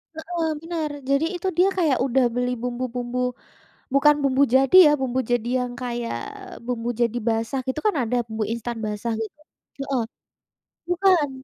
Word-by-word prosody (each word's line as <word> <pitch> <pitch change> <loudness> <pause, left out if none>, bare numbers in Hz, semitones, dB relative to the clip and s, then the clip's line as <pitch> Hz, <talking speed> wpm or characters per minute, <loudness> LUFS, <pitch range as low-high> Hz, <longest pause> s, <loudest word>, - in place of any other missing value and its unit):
Heeh, 325 +1 -3
benar. 325 -2 -3 0.2
Jadi 275 +3 +3
itu 355 +2 -3
dia 365 +2 +5
kayak 310 -7 +2
udah 265 0 +2
beli 245 +1 -1
bumbu-bumbu 245 0 -3 0.8
bukan 295 +2 +6
bumbu 275 0 +3
jadi 270 +7 +5
ya, - - +7
bumbu 260 -1 -1
jadi 240 -1 +1
yang 250 -1 -3
kayak 240 -1 -3 0.5
bumbu 240 -1 -2
jadi 235 0 +1
basah 230 +4 0
gitu 260 +4 -2
kan 420 - +3
ada 240 +2 -1
bumbu 220 -1 -4
instan 235 0 -4
basah 210 +2 -2
gitu 225 +6 -5 0.5
heeh, 250 -4 +1 0.9
bukan. 355 -5 +3
250 Hz, 150 wpm, -24 LUFS, 240-300 Hz, 0.9 s, ya